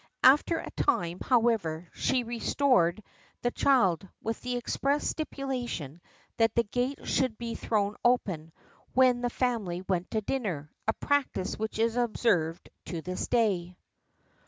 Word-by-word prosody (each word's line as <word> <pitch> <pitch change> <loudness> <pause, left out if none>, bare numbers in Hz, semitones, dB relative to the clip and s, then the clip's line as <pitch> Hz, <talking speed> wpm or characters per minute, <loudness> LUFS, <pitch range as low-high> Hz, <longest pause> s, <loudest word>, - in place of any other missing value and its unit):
After 295 +5 +6
a - - -6
time, 175 - 0
however, 220 -10 +1
she 255 -2 +1
restored 230 -5 +2 0.4
the 245 - +1
child; 195 - +2
with 225 0 -3
the 250 0 -2
express 275 +4 0
stipulation, 250 - -4 0.4
that 225 0 +3
the 235 - +4
gates 245 +5 -2
should 255 -5 +1
be 235 -1 -4
thrown 210 -2 0
open, 190 -10 +1 0.4
when 255 -1 +5
the 245 - 0
family 220 -9 -1
went 180 -2 -1
to 220 - -1
dinner 190 - -3 0.2
a 220 - +3
practice 280 -10 0
which 220 0 -3
is 230 +1 +1
observed 205 -9 +1 0.2
to 165 -3 -5
this 185 0 -3
day." 185 -7 +1
225 Hz, 135 wpm, -29 LUFS, 180-250 Hz, 0.4 s, After